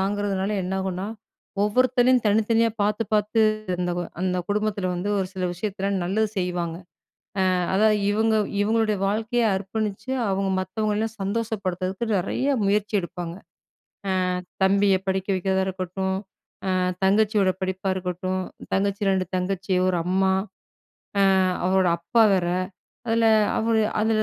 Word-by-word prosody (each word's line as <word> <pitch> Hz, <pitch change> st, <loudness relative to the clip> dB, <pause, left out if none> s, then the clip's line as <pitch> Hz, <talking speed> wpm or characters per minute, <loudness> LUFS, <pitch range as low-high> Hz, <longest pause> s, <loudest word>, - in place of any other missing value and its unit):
தாங்குறதுனால 200 Hz, 0 st, -1 dB
என்ன 185 Hz, -, -3 dB
ஆகும்னா, 190 Hz, +1 st, -3 dB, 0.6 s
ஒவ்வொருத்தளையும் 250 Hz, +3 st, +3 dB
தனித்தனியா 225 Hz, +2 st, +3 dB
பாத்து 210 Hz, +2 st, +1 dB
பாத்து 210 Hz, +2 st, +2 dB, 0.3 s
இருந்தவ, 175 Hz, 0 st, -2 dB, 0.2 s
அந்த 180 Hz, -1 st, 0 dB
குடும்பத்துல 205 Hz, -2 st, 0 dB
வந்து 180 Hz, +4 st, -3 dB
ஒரு 190 Hz, -, 0 dB
சில 185 Hz, -1 st, -2 dB
விஷயத்தலாம் 195 Hz, +1 st, -2 dB
நல்லது 215 Hz, +4 st, +1 dB
செய்வாங்க. 175 Hz, -2 st, -2 dB, 0.8 s
அ -, -, +2 dB, 0.2 s
அதாவது 215 Hz, +1 st, +4 dB
இவங்க 220 Hz, +1 st, +2 dB, 0.3 s
இவங்களுடைய 215 Hz, -1 st, +1 dB
வாழ்க்கைய 225 Hz, +3 st, 0 dB
அர்ப்பணிச்சு 205 Hz, +4 st, -4 dB, 0.2 s
அவங்க 195 Hz, 0 st, 0 dB
மத்தவங்களல்லாம் 215 Hz, +3 st, -2 dB
சந்தோஷப்படுத்துறதுக்கு 195 Hz, -1 st, -2 dB
நறைய 265 Hz, +10 st, 0 dB
முயற்சி 210 Hz, +1 st, 0 dB
எடுப்பாங்க. 175 Hz, -1 st, -6 dB, 0.8 s
அ -, -, +2 dB, 0.5 s
தம்பிய 195 Hz, 0 st, +4 dB
படிக்க 190 Hz, 0 st, 0 dB
வைக்கிறதா 190 Hz, +1 st, +1 dB
இருக்கட்டும், 190 Hz, 0 st, -2 dB, 0.5 s
அ -, -, +2 dB, 0.3 s
தங்கச்சியோட 205 Hz, 0 st, +3 dB
படிப்பா 190 Hz, +1 st, -2 dB
இருக்கட்டும், 185 Hz, +1 st, -2 dB, 0.3 s
தங்கச்சி, 200 Hz, +1 st, 0 dB
2 190 Hz, -1 st, +1 dB
தங்கச்சி, 185 Hz, 0 st, -1 dB
ஒரு 180 Hz, -, +1 dB
அம்மா 190 Hz, +1 st, +2 dB, 0.9 s
அ -, -, +5 dB, 0.4 s
அவரோட 190 Hz, -1 st, +3 dB
அப்பா 225 Hz, +7 st, +3 dB
வேற. 180 Hz, -2 st, 0 dB, 0.6 s
அதுல 230 Hz, 0 st, +3 dB, 0.3 s
அவுரு 225 Hz, 0 st, +2 dB, 0.2 s
அதுல 215 Hz, 0 st, +2 dB
195 Hz, 120 wpm, -24 LUFS, 185-215 Hz, 0.9 s, அ